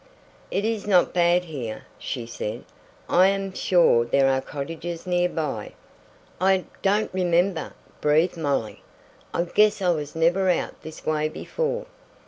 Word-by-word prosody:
"It 200 - -1
is 220 -2 -2
not 185 -4 +4
bad 175 0 +3
here," 130 -9 -6 0.2
she 120 -3 -4
said. 115 -2 -5 0.4
"I 185 +2 +5
am 195 -1 -1
sure 175 -12 +4
there 135 +3 +3
are 130 0 +1
cottages 165 +5 -6
near 180 0 +1
by." 140 -11 -4 0.7
"I 190 0 +3 0.2
don't 205 +1 +1
remember," 180 -1 +1 0.3
breathed 155 +4 +3
Molly. 140 -9 -2 0.5
"I 170 - 0
guess 210 +4 +3
I 185 -2 +1
was 150 -2 -3
never 175 +4 +2
out 180 - -1
this 160 0 -10
way 155 0 0
before." - - -3
175 Hz, 140 wpm, -24 LUFS, 150-190 Hz, 0.7 s, I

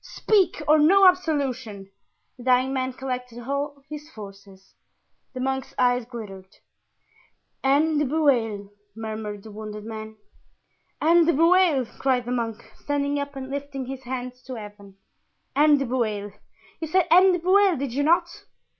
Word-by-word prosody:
Speak, 405 -4 +1
or 305 +1 +5
no 380 +6 +6
absolution!" 260 - -1 0.4
The 245 - -13
dying 255 +1 +3
man 260 -1 -2
collected 250 -2 -5
all 280 0 -3
his 300 0 -9
forces. 195 -5 -13 0.6
The - - -4
monk's 265 +1 -3
eyes 245 -1 +2
glittered. 200 -6 -10 1.1
"Anne 295 +3 +3
de 295 - +1
Bueil," 240 -9 0 0.2
murmured 215 -2 -6
the 220 - -11
wounded 210 0 -8
man. 220 -1 -7 0.8
"Anne 335 +1 +4
de 340 - +4
Bueil!" 330 -3 +4
cried 255 -2 +1
the 245 - -4
monk, 230 -2 -3
standing 285 0 -1
up 285 0 -5
and 265 0 -7
lifting 280 -1 -5
his 265 +1 -7
hands 250 0 -6
to 260 - -6
Heaven. 205 -3 -11 0.6
"Anne 295 +1 +5
de 275 - -1
Bueil! 215 -5 -2 0.5
You 320 - -4
said 370 +3 +2
Anne 370 +2 +7
de - - +1
Bueil, 375 0 +3
did 265 -2 -4
you 280 - 0
not?" 325 +4 +1
260 Hz, 150 wpm, -24 LUFS, 225-295 Hz, 1.1 s, Anne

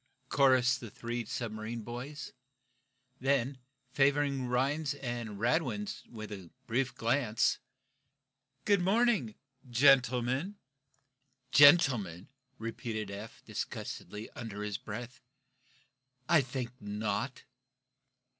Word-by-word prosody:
chorused 130 -2 +4
the 115 - -8
three 120 +2 -4
submarine 110 0 -4
boys. 130 +5 -7 0.9
Then, 135 0 +1 0.3
favoring 140 -1 +2
Rhinds 140 +4 0
and 120 -6 -5
Radwin 165 - +1 0.2
with 105 -6 -8 0.2
brief 130 +3 0
glances: 115 -1 +1 1.1
"Good 200 -3 +4
morning 200 - +2 0.3
gentlemen!" 130 - +3 1.0
"Gentlemen?" 130 - +6 0.3
repeated 110 -2 -4
Eph, 105 +3 -9
disgustedly, 105 +2 -5
under 105 -3 -6
his 105 -2 -3
breath. 120 +4 -7 1.1
"I 170 -3 +6
think 125 -2 -4
not!" 105 +5 -3
125 Hz, 85 wpm, -32 LUFS, 110-140 Hz, 1.1 s, Gentlemen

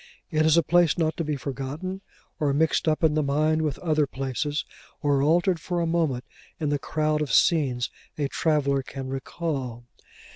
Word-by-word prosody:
It 155 0 +3
is 160 +1 +5
a 170 - +5
place 175 -1 +3
not 160 -2 +1
to 170 - -1
be 150 -1 -1
forgotten 140 +8 -5 0.4
or 150 -2 +2
mixed 160 +2 +2
up 155 +1 +1
in 160 -2 +4
the 155 - +2
mind 155 +2 +1
with 150 -4 -1
other 155 -4 +1
places, 135 +3 -2 0.4
or 140 -2 +3
altered 170 +4 +3
for 175 +2 -2
a 170 - +1
moment 160 -7 0 0.4
in 155 -3 -1
the 145 -1 0
crowd 155 +1 0
of 150 - -2
scenes 135 -8 +3 0.3
a 145 -2 0
traveller 140 -2 +1
can 135 0 -7
recall. 135 -3 -4
150 Hz, 180 wpm, -26 LUFS, 140-160 Hz, 0.4 s, is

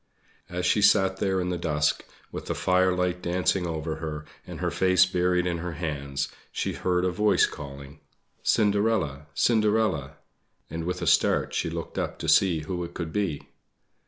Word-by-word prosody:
As 90 0 -3
she 105 - +3
sat 95 -2 +4
there 95 -1 0
in 90 0 -1
the 90 -1 -2
dusk, 75 -2 0 0.3
with - - -7
the - - -2
firelight 90 -1 +1
dancing 90 +1 0
over 80 -1 -3
her, 75 -1 -5 0.2
and - - -8
her - - -1
face 95 -1 +4
buried 90 -1 +1
in 85 -1 -1
her 90 0 -4
hands, 70 -4 -3 0.2
she - - -2
heard 90 0 0
a 90 - +1
voice 105 +4 +3
calling: 70 0 -9 0.4
"Cinderella, 100 -9 +1
Cinderella!" 110 - +2 0.6
and 80 0 -4
with 90 - -3
a - - -1
start - - +3
she - - -1
looked 85 0 -5
up - - -3
to - - -5
see 90 -5 +4
who 90 +3 -4
it 85 0 -8
could 80 -2 -5
be. 95 -9 -2
90 Hz, 170 wpm, -26 LUFS, 80-95 Hz, 0.6 s, sat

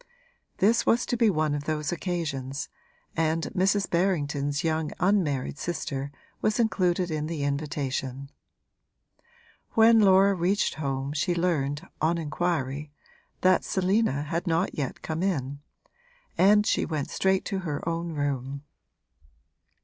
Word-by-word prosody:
This 225 +5 +3
was 240 +1 +2
to - - -1
be 230 -2 +4
one 155 -5 +1
of 145 0 -3
those 150 -1 -1
occasions, 155 -6 -3 0.5
and 160 0 +1
Mrs. 195 +2 +2
Berrington's 150 -4 0
young 160 -1 0
unmarried 170 -9 +1
sister 140 -4 -3 0.3
was 215 +2 +1
included 180 -6 +1
in 155 -1 -2
the 160 -3 -3
invitation. 140 -2 -3 1.4
When 225 0 +6
Laura 195 -1 +6
reached 190 +3 +1
home 140 -1 -3
she 165 +4 0
learned, 150 -5 -1
on 165 +2 +2
inquiry, 150 -3 -2 0.5
that 185 0 +4
Selina 190 -6 +1
had 170 +5 -3
not 165 +3 +1
yet 140 -4 -4
come 160 +1 -3
in, 140 -7 -1 0.8
and 210 +2 +5
she - - +2
went 155 -4 -3
straight 190 0 +1
to 195 -2 -2
her 160 -4 -4
own 165 0 -2
room. 140 -1 -3
160 Hz, 125 wpm, -27 LUFS, 145-185 Hz, 1.4 s, When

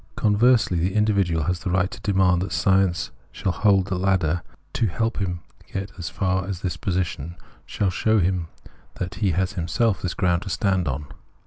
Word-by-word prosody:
Conversely 110 -3 +3
the 90 +4 0
individual 100 -7 +2
has 90 +2 -1
the 95 - -4
right 90 +1 +1
to - - -9
demand 95 -3 +3
that 95 - -3
science 95 -2 +2 0.2
shall 95 - -1
hold 95 0 +3
the 95 -2 -2
ladder 90 -3 +1 0.3
to 115 - +1
help 115 +7 -1
him 90 -3 -2 0.2
to - - -24
get 95 - -1
at 100 - -11
least - - -19
as 85 -1 -4
far 95 0 -1
as 95 -2 -4
this 90 - -2
position, 90 -4 -2 0.3
shall 95 -3 0
show 110 +4 +2
him 90 -2 0 0.5
that 90 -2 -4
he 100 - +3
has 95 +2 0
in - - -15
himself 105 +5 +1
this 90 - -3
ground 90 -3 +1
to 100 - -6
stand 95 -1 +1
on. 70 +2 -2
95 Hz, 205 wpm, -24 LUFS, 90-100 Hz, 0.5 s, Conversely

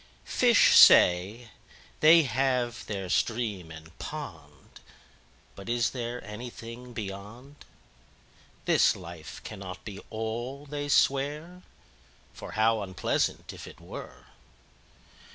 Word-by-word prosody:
5Fish - - +4
say, 100 +7 +6 0.5
they 160 +2 +7
have 125 -2 -1
their 100 -3 -4
Stream 105 -4 -1
and 80 0 -12
Pond;6But 100 +3 -12
is 120 -1 +1
there 120 -1 -5
anything 115 +2 -9
Beyond?7This 110 +6 -4
life 85 -4 -10
cannot 95 -3 -9
be 100 -3 -7
All, 120 +6 -5
they 145 0 -5
swear,8For 145 - -3
how 110 0 +2
unpleasant, 95 -2 -2
if - - -10
it - - -13
were! - - -10
115 Hz, 90 wpm, -28 LUFS, 100-130 Hz, 0.5 s, they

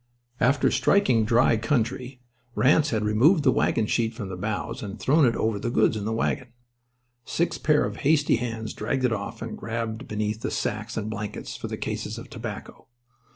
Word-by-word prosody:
After 135 +3 +3
striking 125 - +3
dry 115 +1 +4
country 125 +2 -2 0.3
Ranse 150 +3 +4
had 110 -4 0
removed 140 - +4
the 130 - +5
wagon 115 - +1
sheet 115 +1 0
from 105 -5 -6
the 95 - -5
bows 110 +6 -3
and 100 -1 -6
thrown 150 +2 +4
it 115 - +1
over 110 -2 0
the 120 - -2
goods 110 -2 +3
in 105 -1 -3
the 110 - -1
wagon. 115 +3 -1 0.8
Six 170 - -1
pair 150 -1 +3
of - - -5
hasty 145 -3 +3
hands 115 -2 -4
dragged 130 -2 -1
it 120 - +2
off 110 +2 -5
and 115 - -5
grabbled 115 +2 -4
beneath 105 0 -2
the - - -2
sacks 110 +2 -3
and 110 -1 -2
blankets 105 -1 -5
for - - -6
the - - -5
cases - - -4
of - - -10
tobacco. - - -8
115 Hz, 190 wpm, -25 LUFS, 110-130 Hz, 0.8 s, the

